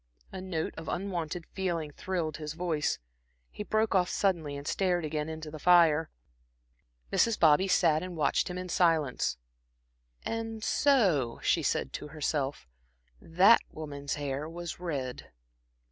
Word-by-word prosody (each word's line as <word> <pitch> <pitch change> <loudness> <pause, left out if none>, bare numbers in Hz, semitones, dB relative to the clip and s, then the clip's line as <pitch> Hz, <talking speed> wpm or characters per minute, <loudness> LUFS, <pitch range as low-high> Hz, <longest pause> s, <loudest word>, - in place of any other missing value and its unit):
A 185 - -6
note 175 -4 -3
of 165 - -6
unwonted 175 -3 -3
feeling 170 -5 -3
thrilled 165 -1 -3
his 150 -1 -5
voice. 160 -3 -1 0.5
He - - -8
broke 215 +1 0
off 180 -2 +3
suddenly 165 -8 0
and 140 +1 -8
stared 180 -3 0
again 150 0 -3
into 160 -1 -7
the 155 - -8
fire. 165 -2 +5 1.0
Mrs. 230 -2 +3
Bobby 160 +4 +5
sat 160 -4 +3
and 180 -2 -6
watched 155 - +1
him 180 -1 -5
in 185 0 -5
silence. 165 - +1 0.9
"And 225 -1 -4
so," 185 - +2
she - - +2
said 65 - -1
to - - -5
herself, 145 - -2 0.5
"that 190 +8 +5
woman's 145 -2 -5
hair 145 +1 -3
was 170 0 -6
red." 140 -8 -4
165 Hz, 140 wpm, -30 LUFS, 150-185 Hz, 1.0 s, fire